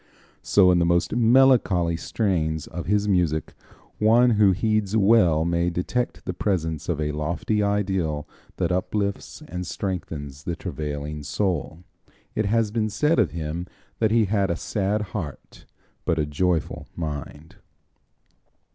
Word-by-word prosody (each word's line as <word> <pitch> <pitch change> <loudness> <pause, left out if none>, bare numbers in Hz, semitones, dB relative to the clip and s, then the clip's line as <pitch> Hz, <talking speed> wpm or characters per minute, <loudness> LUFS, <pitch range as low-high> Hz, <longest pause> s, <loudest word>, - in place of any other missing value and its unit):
So 95 -3 +5
in 90 - +3
the - - +3
most 85 +4 +1
melancholy 120 -8 +4
strains 80 -5 -1
of 85 -1 -7
his 105 +1 +1
music 85 -5 +1 0.5
one 115 +3 +5
who 105 -3 +5
heeds 110 +1 0
well 95 -7 +4
may 85 0 +1
detect 90 +8 -2
the 90 - -2
presence 80 -5 -2
of 80 -3 -1
a 75 -1 -1
lofty 85 +8 -1
ideal 95 -7 -1 0.3
that - - 0
uplifts 100 +2 -2
and 90 0 -5
strengthens 75 -8 -5
the 85 - -2
travailing 75 -1 -5
soul. 85 +1 -2 0.5
It 110 -1 0
has 110 0 +1
been 110 -1 0
said 150 +7 +2
of 105 - +3
him 85 +2 -4 0.3
that 110 - +3
he 110 0 +3
had 100 -1 +1
a 85 - 0
sad 105 +4 -1
heart 80 -10 -7 0.4
but 80 - 0
a 75 - +1
joyful 80 +1 -1
mind. 75 -1 -6
90 Hz, 140 wpm, -24 LUFS, 80-105 Hz, 0.5 s, So